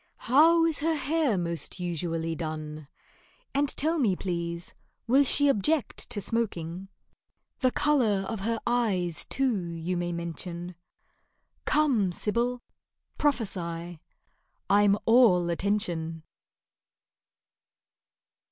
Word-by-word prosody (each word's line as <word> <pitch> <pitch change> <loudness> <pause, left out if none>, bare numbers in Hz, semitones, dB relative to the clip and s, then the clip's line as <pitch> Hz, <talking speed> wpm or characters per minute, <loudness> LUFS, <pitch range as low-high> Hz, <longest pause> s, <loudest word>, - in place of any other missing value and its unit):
How 330 +6 +5
is 325 -2 0
her 320 +2 +1
hair 295 -6 +1
most 170 0 -4
usually 165 -1 -2
done? 155 -2 -6 0.7
And 280 +1 +2
tell 320 +3 +1
me, 215 -9 +2
please, 170 -2 -4 0.3
will 265 +4 +4
she 285 +1 +4
object 275 +3 0
to 220 - -2
smoking? 190 -5 -2 0.7
The 255 - +3
colour 240 -9 +1
of 225 - -4
her 225 +3 -1
eyes, 205 -9 +1
too, 260 -6 0
you 170 +1 -4
may 175 0 -2
mention: 170 +1 -5 0.9
Come, 260 -11 +2
Sibyl, 240 +6 -1 0.6
prophesy—I'm 195 - -1
all 210 -8 +5
attention. 170 -4 -1
200 Hz, 95 wpm, -27 LUFS, 170-255 Hz, 0.9 s, How